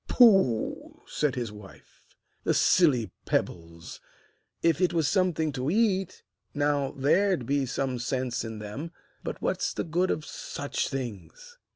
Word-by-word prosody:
'Pooh!' 195 - +3
said 150 -4 -1
his 120 -4 -3
wife, 105 -2 -15 0.4
'the - - +1
silly 135 -11 +3 0.2
pebbles! 85 0 -3 0.6
If 165 0 +3
it 180 -1 +2
was 165 -3 +2
something 170 -5 +1
to 135 0 -2
eat, 195 -2 +1 0.3
now, 145 -1 +1
there'd 175 +2 +2
be 140 +1 0
some 130 0 -2
sense 125 0 -2
in 110 -1 -6
them; 105 +11 -7 0.3
but - - -5
what's - - -1
the - - -1
good 175 +3 0
of 155 - -1
such 145 0 -4
things?' 135 - -7
145 Hz, 140 wpm, -27 LUFS, 120-175 Hz, 0.6 s, Pooh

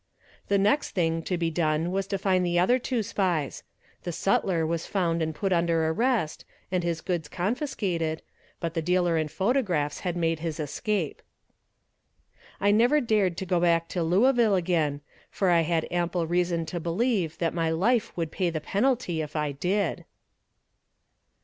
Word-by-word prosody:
The 200 - +3
next 210 +9 +1
thing 165 -2 +1
to 180 - -1
be 165 -1 -1
done 160 +1 0
was 195 +1 -1
to 195 - -1
find 185 -1 +1
the 175 -1 0
other 215 +9 +4
two 245 -2 -1
spies. 180 -9 -1 0.4
The 175 - -4
sutler 175 -1 +1
was 165 +1 -2
found 170 -4 0
and 160 -1 -2
put 190 +5 0
under 170 -2 +2
arrest, 220 -3 0 0.3
and 180 -2 0
his 170 -1 -2
goods 170 -5 -2
confiscated, 180 - -2 0.4
but 165 -1 -3
the 165 - -1
dealer 175 0 +2
in 155 -1 0
photographs 190 - 0
had 180 -2 -3
made 165 -1 0
his 165 -1 -4
escape. 165 +3 -2 1.4
I 200 +1 +3
never 240 +8 +4
dared 210 - +1
go 180 -1 +2
back 170 -1 +2
to 180 - -2
Louisville 215 +6 +3
again, 165 -5 0 0.3
for 190 -3 +1
I 170 -1 +5
had 165 0 0
ample 175 -1 0
reason 175 0 0
to 170 +2 -4
believe 175 0 0
that 165 -1 -1
my 165 -1 0
life 210 +8 +1
would 165 -2 -2
pay 185 -3 0
the 160 -2 -3
penalty 200 - 0
if 150 0 -7
I 150 -1 0
did. 185 +9 -1
175 Hz, 165 wpm, -27 LUFS, 165-195 Hz, 1.4 s, I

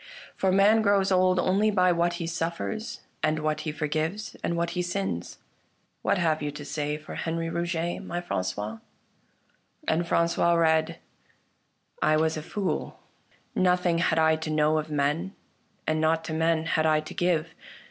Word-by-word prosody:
For 190 - +1
man 205 +4 +5
grows 200 -2 +3
old 185 0 +4
only 195 +4 +3
by 185 -3 +3
what 175 0 +1
he 170 -1 -4
suffers, 170 +6 -3 0.2
and 155 0 +1
what 155 0 -1
he - - -1
forgives, 155 +7 -2
and 170 - -1
what 170 0 0
he 180 - -1
sins. 95 - -3 0.6
What - - +1
have 160 -3 +1
you 145 - -1
to 145 0 -8
say 150 +1 -2
for 155 - -10
Henri 165 0 -2
Rouget, 170 0 -2
my 175 - -3
Franqois? 105 - -3 0.5
" - - -33
And 170 +2 +1
Francois 170 +1 +2
read: 160 -1 +2 0.5
" - - -37
I 155 - +4
was 160 0 +1
a 155 - -4
fool; 195 +4 -3 0.5
nothing 180 -2 +2
had 165 -1 +2
I 160 0 +4
to 160 0 -5
know 155 0 +2
Of 155 0 -5
men, 150 +6 -1 0.5
and 155 0 0
naught 160 +1 +2
to 160 - -5
men 160 0 +1
had 160 -1 +2
I 155 -1 +4
to 155 - -9
give. 165 -2 0
165 Hz, 170 wpm, -27 LUFS, 155-175 Hz, 0.6 s, man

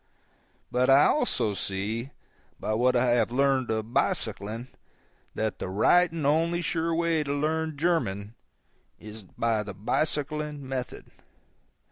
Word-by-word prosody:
But 125 +1 +2
I 135 +2 +7
also 245 - +1
see, 105 +6 -3 0.5
by 110 - -2
what 125 +3 +2
I 120 0 +3
have 120 -1 +2
learned 135 0 +1
of 110 +1 -3
bicycling, 110 +5 -1 0.7
that 110 -3 -2
the - - -4
right 170 - +4
and 165 -3 -4
only 165 +4 +2
sure 165 0 -1
way 165 -1 +1
to 140 - -4
learn 155 +1 -1
German 115 - -1 0.7
is 110 +1 -9
by 110 +4 -1
the 100 -2 -7
bicycling 150 - -1
method. 130 -1 -5
130 Hz, 130 wpm, -27 LUFS, 110-155 Hz, 0.7 s, I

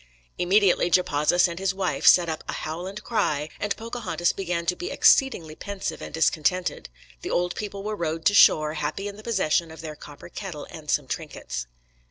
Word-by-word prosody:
Immediately 185 -1 +3
Japazaws 175 0 +3
and 170 0 -6
his 190 0 0
wife 190 -2 -1
set 175 -2 +7
up 160 -1 -4
"a - - -2
howl 165 +4 -5
and 205 +2 -7
cry," 155 -10 0
and 205 -1 -2
Pocahontas 220 -7 -1
began 175 -3 -3
to 180 - +1
be 360 - -5
"exceedingly 175 - +3
pensive 200 +4 -5
and - - -7
discontented." 160 +3 0 0.3
The - - -5
old 180 0 0
people 200 -2 -5
were 215 +1 -3
rowed 165 -3 -3
to 205 - +5
shore, 155 -6 +6
happy 155 +6 -3
in 200 - -6
the 210 - -11
possession 185 -7 0
of 160 0 -10
their 155 -2 -7
copper 145 +2 -12
kettle 175 -6 -7
and 155 -2 -10
some 145 - +1
trinkets. 130 - -5
175 Hz, 190 wpm, -25 LUFS, 155-200 Hz, 0.3 s, set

